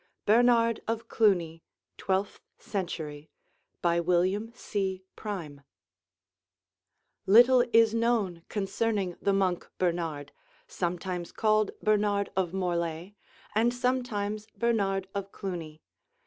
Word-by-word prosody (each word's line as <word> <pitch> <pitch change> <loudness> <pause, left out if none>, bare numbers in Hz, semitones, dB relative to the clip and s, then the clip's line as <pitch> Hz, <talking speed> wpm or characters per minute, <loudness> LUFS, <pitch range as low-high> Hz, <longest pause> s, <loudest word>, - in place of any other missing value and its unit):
BERNARD 230 +1 +4
OF 225 0 -2
CLUNY 175 -7 +2 0.3
Twelfth 195 +1 -2 0.2
Century 160 -6 -5 0.5
BY 170 0 +3
WILLIAM 185 +6 +1
C. 190 -5 -3
PRIME 170 -10 -6 1.7
Little 245 +5 +7
is 225 -1 +5
known 225 -7 0
concerning 200 -2 -1
the 200 - +2
monk 190 -3 0
Bernard, 165 -5 -2 0.3
sometimes 180 0 -3
called 215 -2 +2
Bernard 205 -1 +1
of 185 -3 0
Morlay 175 -1 -2 0.4
and 225 +3 +3
sometimes 240 -4 -2
Bernard 195 -5 0
of 200 0 -4
Cluny. 165 -5 -6
195 Hz, 95 wpm, -28 LUFS, 175-220 Hz, 1.7 s, Little